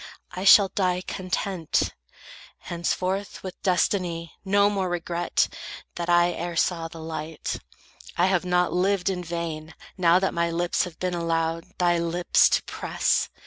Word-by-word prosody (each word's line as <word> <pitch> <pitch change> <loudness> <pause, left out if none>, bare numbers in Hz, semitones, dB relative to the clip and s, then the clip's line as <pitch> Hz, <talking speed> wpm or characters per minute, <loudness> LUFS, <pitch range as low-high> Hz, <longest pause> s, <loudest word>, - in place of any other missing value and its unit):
I 185 +2 -5
shall 200 0 +8
die 180 -2 0
content; 185 -2 -1 0.6
Henceforth, 185 +3 -3
with 185 -1 -8
destiny, 180 -3 0
no 200 +1 +4
more 195 -3 -1
regret 175 0 0 0.5
That 170 0 -4
I 175 0 +4
e'er 170 +1 -4
saw 170 -1 0
the 165 - -12
light. 160 0 -5 0.6
I 175 - +4
have 185 -2 +2
not 180 -1 +1
lived 190 +1 +1
In 180 -1 -4
vain, 160 -2 -5 0.2
now 170 -1 +5
that 190 +1 0
my 170 0 +1
lips 175 +1 0
have 170 -3 -10
been 180 -1 -2
allowed 165 +1 -2
Thy 175 -1 +2
lips 170 +1 +3
to - - +1
press. - - 0
175 Hz, 145 wpm, -25 LUFS, 170-185 Hz, 0.6 s, shall